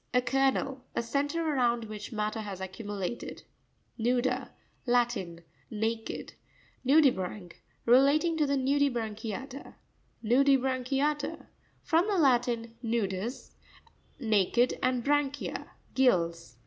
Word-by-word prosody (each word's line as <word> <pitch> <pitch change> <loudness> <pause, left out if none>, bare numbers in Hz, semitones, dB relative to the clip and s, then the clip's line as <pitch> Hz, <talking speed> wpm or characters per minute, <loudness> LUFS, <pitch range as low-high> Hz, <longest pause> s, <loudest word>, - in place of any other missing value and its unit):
— - - -39
A - - +7
kernel. 270 0 +1
A - - 0
centre 290 +6 -1
around 240 -5 +1
which 210 0 -7
matter 215 0 -2
has 200 -3 -6
accumu 200 +2 -6
lated. 240 - -7 0.6
Nou'pa.—Latin. 240 -5 -1 0.3
Naked. 225 +1 -3 0.5
Nv'pisrancu.—Relating 265 - +2
to 305 -2 +1
the 280 0 +1
Nu 270 +2 +1
dibranchiata. 245 0 -3 0.5
No'pisrancuia'TaA.—From 275 - +1
the 410 -2 +1
Latin, 240 -6 +2
nudus, 225 0 -2 0.7
naked, 225 +1 +2
and 255 -1 +1
branchia, 285 -1 0 0.3
gills. 170 - +1
245 Hz, 95 wpm, -29 LUFS, 220-275 Hz, 0.7 s, A